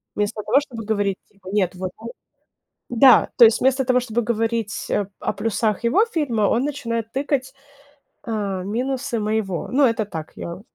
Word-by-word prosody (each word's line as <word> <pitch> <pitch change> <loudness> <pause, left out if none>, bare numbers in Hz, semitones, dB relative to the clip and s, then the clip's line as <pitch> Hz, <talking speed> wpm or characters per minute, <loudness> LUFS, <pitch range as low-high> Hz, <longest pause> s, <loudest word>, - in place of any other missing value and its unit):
Вместо 210 +1 -1
того, 275 - +4
чтобы 245 -7 -8
говорить 205 -3 0
типа: 195 -2 -14
"Нет, 190 -3 0
вот 185 0 -4
он" 230 +1 -8 0.8
Да, 245 +1 +6
то 240 - +10
есть, 225 +1 +3
вместо 265 0 +2
того, 250 -1 +3
чтобы 240 -1 -2
говорить 225 -1 -2
о 205 -2 0
о - - -2
плюсах 215 +1 -1
его 320 - +3
фильма, 290 - -1
он 225 +5 +2
начинает 230 -6 -3
тыкать, 270 0 -2 0.7
а, 200 -5 -3
минусы 245 +4 -2
моего. 210 -4 -2
Ну, 275 +3 +3
это 230 -3 +2
так, 160 -6 -7
я 170 +3 -7
225 Hz, 170 wpm, -22 LUFS, 205-255 Hz, 0.8 s, то